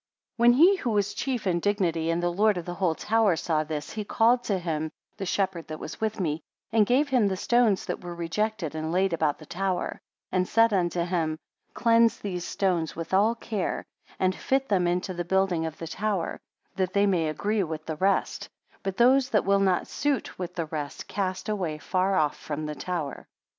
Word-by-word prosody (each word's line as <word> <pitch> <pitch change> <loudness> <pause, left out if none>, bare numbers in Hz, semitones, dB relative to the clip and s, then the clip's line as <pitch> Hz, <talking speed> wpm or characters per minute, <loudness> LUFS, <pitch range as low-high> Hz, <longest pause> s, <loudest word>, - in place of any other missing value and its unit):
57 - - -5
When 240 0 +7
he 370 +6 +7
who 255 - -2
was 205 -2 +1
chief 245 +1 -2
in 175 -2 +1
dignity, 170 -5 0
and 170 +1 0
lord 195 +4 +2
of 175 - -4
the 175 - -4
whole 175 -3 0
tower 220 -2 +2
saw 160 -1 0
this, 150 -1 -5
he 215 - -4
called 235 +4 +3
to 200 - +1
him 160 -3 -2 0.3
the 195 -2 -4
shepherd 185 -3 -1
that 155 - -5
was 155 - -8
with 220 -1 -1
me, 160 -3 -1 0.3
and 220 -2 +4
gave 280 +4 +3
him 250 -6 +3
the 190 -1 -1
stones 235 -2 +2
that - - -4
were 175 -1 -6
rejected 170 0 -2
and 160 0 -3
laid 185 +1 +2
about 155 -3 +1
the 155 - -13
tower, 185 +2 -2 0.3
and 185 0 +1
said 230 -1 +4
unto 175 -2 +1
him; 165 -3 -1 0.4
cleanse 230 0 +4
these 180 -4 -4
stones 175 -5 0
with 165 +2 -6
all 210 +4 +4
care, 215 -4 -3 0.3
and 185 0 +2
fit 270 0 0
them 185 -4 +2
into 180 +2 -1
the 175 0 -3
building 180 -2 +1
of 155 - -7
the 165 - -6
tower, 195 0 -2 0.4
that 185 -1 0
they 200 0 +4
may 175 -5 +2
agree 205 +7 0
with 160 -3 -4
the 160 -1 -4
rest; 195 +4 0 0.3
but 195 -1 -4
those 255 +2 +5
that 210 - +2
will 200 0 +4
not 190 -3 +2
suit 285 -9 -2
with 180 -2 -5
the 165 - -1
rest, 150 -2 -5
cast 185 -2 -3
away 190 -7 -1
afar 185 +5 0
off 150 -4 +2
from 155 0 -5
the 150 - -3
tower. 160 -3 -4
185 Hz, 205 wpm, -27 LUFS, 165-210 Hz, 0.4 s, When